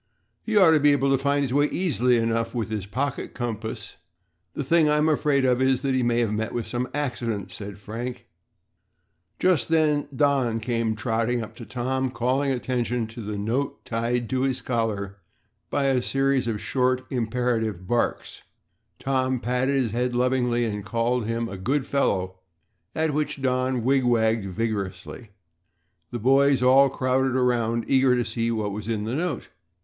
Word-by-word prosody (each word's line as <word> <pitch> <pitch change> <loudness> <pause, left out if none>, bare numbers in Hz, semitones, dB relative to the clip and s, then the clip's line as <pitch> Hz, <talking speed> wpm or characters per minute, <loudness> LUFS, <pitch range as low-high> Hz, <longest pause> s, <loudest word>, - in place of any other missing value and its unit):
"He 220 -2 -1
ought 185 -5 +7
to 155 - +5
be 145 0 +5
able 140 -1 +1
to 135 - +4
find 140 0 +2
his 130 -2 -2
way 145 +1 +4
easily 125 -10 +1
enough 115 +1 -1
with 115 -2 -2
his 105 -3 -3
pocket 130 +7 -3
compass. 110 -2 -5 0.6
The 145 - -2
thing 160 +2 +3
I'm 150 +1 +3
afraid 145 -3 +2
of 125 0 +2
is 130 -1 +2
that 135 -1 +1
he 130 - +2
may 120 0 +2
have 110 -3 0
met 110 +1 -2
with 120 -2 -2
some 125 +1 -3
accident," 120 -8 -3
said 100 -1 -7
Frank. 115 +5 -6 1.1
Just 180 -5 +2
then 155 -3 +2
Don 135 -5 +2
came 115 -1 -1
trotting 115 +1 -1
up 110 - -10
to 115 - -9
Tom, 130 +1 -1
calling 130 +3 0
attention 125 -2 -1
to 115 +1 -8
the 105 -1 -5
note 120 +7 -2
tied 120 +1 -1
to 130 -1 0
his 130 -1 0
collar 110 -5 -2 0.5
by 140 - 0
a 135 -2 +2
series 135 -1 +1
of 110 -3 -2
short, 130 +1 0
imperative 115 -5 -1
barks. 120 +5 -1 0.6
Tom 130 -1 0
patted 125 +3 0
his 125 -5 +1
head 125 +2 -1
lovingly 125 -1 +1
and 105 -2 -3
called 115 +1 -1
him 115 0 -1
a 100 - -7
"good 130 +9 -1
fellow" 95 -10 0 0.6
at 160 -1 0
which 150 -1 -1
Don 130 -1 0
wig 135 +2 +3
wagged 115 -3 +2
vigorously. 105 +1 -4 0.8
The 120 - -4
boys 135 +2 +3
all 135 +2 +6
crowded 130 0 0
around, 120 -2 +1
eager 130 -1 +4
to 120 -1 0
see 115 +1 -1
what 110 -3 -1
was 105 +1 -6
in 110 -2 -1
the 110 +3 -3
note. 160 -3 -2
125 Hz, 170 wpm, -25 LUFS, 115-135 Hz, 1.1 s, ought